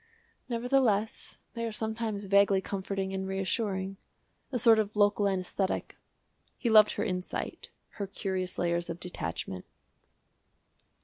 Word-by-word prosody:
"Nevertheless, 235 -3 +1 0.2
they 230 - -4
are - - -3
sometimes 220 -1 -3
vaguely 200 0 +5
comforting 195 0 -3
and 190 0 -2
reassuring 190 0 -1 0.5
a 255 - 0
sort 230 -2 +6
of 215 0 -1
local 205 0 +3
anæsthetic." 190 0 -1 0.7
He 235 - 0
loved 215 -1 +7
her 205 - -1
insight, 180 -3 -4 0.3
her 200 - -2
curious 185 -2 -3
layers 170 0 0
of 170 +1 -4
detachment. 90 - -5
200 Hz, 120 wpm, -30 LUFS, 190-220 Hz, 0.7 s, loved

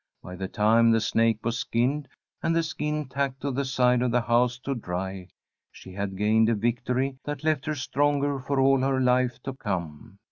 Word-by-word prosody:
By 90 - -8
the 95 +1 -4
time 110 +4 +3
the 115 0 +4
snake 115 0 +1
was 115 +1 -1
skinned, 135 +5 0 0.3
and 165 - +1
the 165 - +2
skin 150 -2 -3
tacked 135 0 -2
to 140 - -2
the 135 +2 -1
side 125 -2 +2
of 125 - +1
the 120 +1 +2
house 120 +1 +2
to 140 - -2
dry, 95 -4 -5 0.4
she 95 - -13
had 100 0 -4
gained 110 +2 +3
a 115 - +2
victory 125 +4 -1
that 145 +1 -5
left 155 -2 0
her 155 - -1
stronger 145 +1 0
for 135 +1 -2
all 135 0 +4
her 135 0 +1
life 125 -1 +2
to 135 - -4
come. 90 - -5
125 Hz, 200 wpm, -26 LUFS, 110-140 Hz, 0.4 s, the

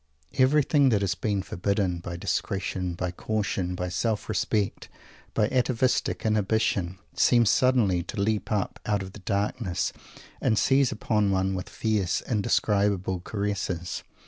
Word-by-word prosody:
Everything 140 +1 +4
that 105 -4 +2
has 95 -3 +1
been 100 +2 -1
forbidden, 95 -1 -1
by 85 0 -6
discretion, 90 0 -2
by 90 0 -2
caution, 95 -2 -2
by 90 0 -3
self 100 +5 -1
respect, 105 -1 -1 0.5
by 105 - +3
atavistic 130 -2 +1
inhibition, 105 -4 +1 0.2
seems 120 -3 +4
suddenly 120 -9 +3
to 90 - -6
leap 105 +2 0
up 105 -3 -1
out 105 -2 +1
of 95 0 -9
the - - -10
darkness 100 0 -1 0.5
and 110 - +2
seize 135 +1 +3
upon 105 -2 +1
one 95 0 +1
with 90 -1 -4
fierce, 105 -6 0
indescribable 100 -4 +1
caresses. 100 -3 -3
100 Hz, 135 wpm, -26 LUFS, 95-110 Hz, 0.5 s, Everything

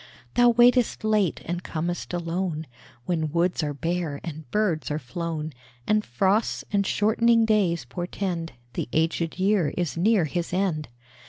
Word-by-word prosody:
Thou 245 0 +6
waitest 240 0 +4
late 210 -5 +1
and 175 +1 -3
com'st 170 +2 -3
alone, 170 -2 -2 0.4
When 160 -2 -1
woods 175 +2 +1
are 145 -2 -2
bare 165 -2 -2
and 155 -4 -7
birds 195 - 0
are 150 - -1
flown, 155 +3 -4 0.3
And 215 0 +2
frosts 195 - +1
and 200 -1 +2
shortening 230 +2 +3
days 185 - +2
portend 175 +4 -4 0.2
The 120 - -3
aged 165 +1 0
year 190 -4 +2
is 175 -3 -1
near 200 0 +3
his 170 +3 -3
end. 180 -5 0
175 Hz, 145 wpm, -25 LUFS, 160-205 Hz, 0.4 s, Thou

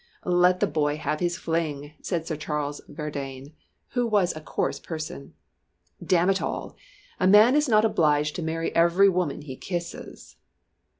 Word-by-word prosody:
"Let 180 0 +3
the - - +5
boy 150 -1 0
have 155 0 -2
his 175 0 -1
fling," 155 -4 -3
said 170 -3 -2
Sir 160 - -3
Charles 150 -1 -3
Verdayne, 140 -2 -6 0.4
who 245 -1 0
was 200 -6 +2
a 155 - -7
coarse - - -2
person. 155 - -7 0.7
"Damn 180 +1 +3
it 195 - -1
all! - - -4 0.4
a 185 - +3
man 215 +7 +7
is 300 -2 +2
not 215 -1 +5
obliged 150 -7 +2
to - - -3
marry 165 0 -2
every 170 +4 +5
woman 175 -6 -1
he 135 -3 -7
kisses!" 175 +3 -7
165 Hz, 160 wpm, -25 LUFS, 150-185 Hz, 0.7 s, man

